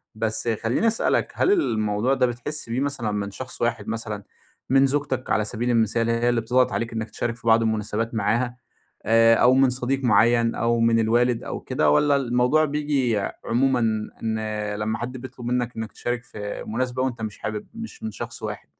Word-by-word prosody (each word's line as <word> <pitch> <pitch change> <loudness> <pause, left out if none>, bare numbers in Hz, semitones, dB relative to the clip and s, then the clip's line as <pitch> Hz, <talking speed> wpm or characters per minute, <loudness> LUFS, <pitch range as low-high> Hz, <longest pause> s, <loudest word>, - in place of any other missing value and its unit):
بس 110 +1 -2 0.2
خلّيني 125 - +1
أسألك 225 - +1
هل 380 - +3
الموضوع 110 - +1
ده 130 - +3
بتحس 120 +2 -4
بيه 120 +3 -1
مثلًا 135 -7 -2
من 100 -1 -3
شخص 125 +4 -8
واحد 120 0 -1
مثلًا، 110 -2 -4 0.5
من 135 +1 +5
زوجتك 135 -2 -1
على 105 -1 +2
سبيل 120 +2 -2
المثال 115 0 +2
هي 115 +1 +2
اللي 120 -1 +1
بتضغط 125 +3 +2
عليك 115 0 -2
إنك 110 0 -3
تشارك 115 -1 -3
في 120 -1 -10
بعض 115 0 +6
المناسبات 110 +1 -1
معاها 120 +4 0 0.5
آآ، 115 +1 +5
أو 125 +2 +5
من 135 -1 +5
صديق 130 +2 -1
معيّن 115 +1 +4
أو 115 0 +1
من 115 0 +3
الوالد 120 +2 +2
أو - - -5
كده، 75 - +1
والّا 140 - +4
الموضوع 125 +4 +2
بييجي 140 -6 0 0.3
عمومًا 130 +2 +2 0.4
إن 110 -1 -1 0.4
لمّا 110 +2 -2
حد 125 +2 -5
بيطلب 125 -1 -9
منك 125 0 -1
إنك 110 -1 -4
تشارك 120 0 -3
في 105 -2 -6
مناسبة 125 +3 -1
وأنت 120 -3 -3
مش 110 -2 -5
حابب 105 -1 -4
مش 225 0 -9
من 220 - -3
شخص - - -7
واحد؟ - - -5
120 Hz, 185 wpm, -24 LUFS, 110-130 Hz, 0.5 s, بعض